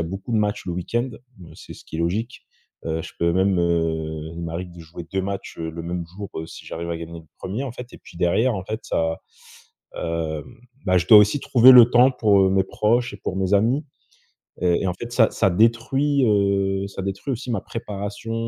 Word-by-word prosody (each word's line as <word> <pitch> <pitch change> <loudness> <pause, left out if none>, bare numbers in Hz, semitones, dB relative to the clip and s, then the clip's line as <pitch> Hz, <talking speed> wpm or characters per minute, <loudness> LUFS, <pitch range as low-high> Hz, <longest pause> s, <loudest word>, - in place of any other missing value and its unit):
a 80 - -1
beaucoup 95 +5 -7
de - - +2
matchs 105 -1 -1
le - - -2
week-end. 120 +8 -2 0.3
Mais, 85 - -13
c'est - - -11
ce - - -15
qui 80 - -7
est - - -3
logique, 105 +9 -2 0.4
heu, 80 0 -1
je - - -10
peux 85 0 +2
même, 95 0 +2
heu, 80 -2 -1
il 85 - -6
m'arrive 85 +2 -5
de 85 - -12
jouer 85 +1 -10
2 95 -1 0
matchs, 100 0 -5
heu, 80 0 -4
le 85 +1 -7
même 85 0 -4
jour 100 -1 -6 0.2
si - - -12
j'arrive 85 +1 -5
à 85 - -2
gagner 85 0 -8
le - - -19
1er 105 +9 -4
en 130 - -5
fait 125 0 -9
et - - -12
puis - - -16
derrière 110 +8 +2
en 95 - -5
fait 110 +3 -4
ça, 80 0 -1 0.8
heu, 80 -2 -3
hem, - - -16 0.3
bah, 90 0 +4
je 90 - -2
dois 110 - +10
aussi 105 +7 +4
trouver 125 +1 +6
le 120 -2 +9
temps 125 +2 +6
pour, 105 -5 +3
heu, 95 - +3
mes 95 0 +2
proches 115 +4 0
et 100 - -10
pour 95 - -4
mes 95 +1 +1
amis 120 +9 +2 0.8
et 90 0 +2
et - - 0
en 90 - 0
fait 120 +5 -8
ça 115 -3 +4
ça 95 - +2
détruit, 125 +7 +2
heu, 100 -1 +1
ça 95 - -7
détruit 100 +8 -4
aussi 125 +1 -7
ma 100 - -1
préparation, 105 0 -6
95 Hz, 230 wpm, -22 LUFS, 85-115 Hz, 0.8 s, dois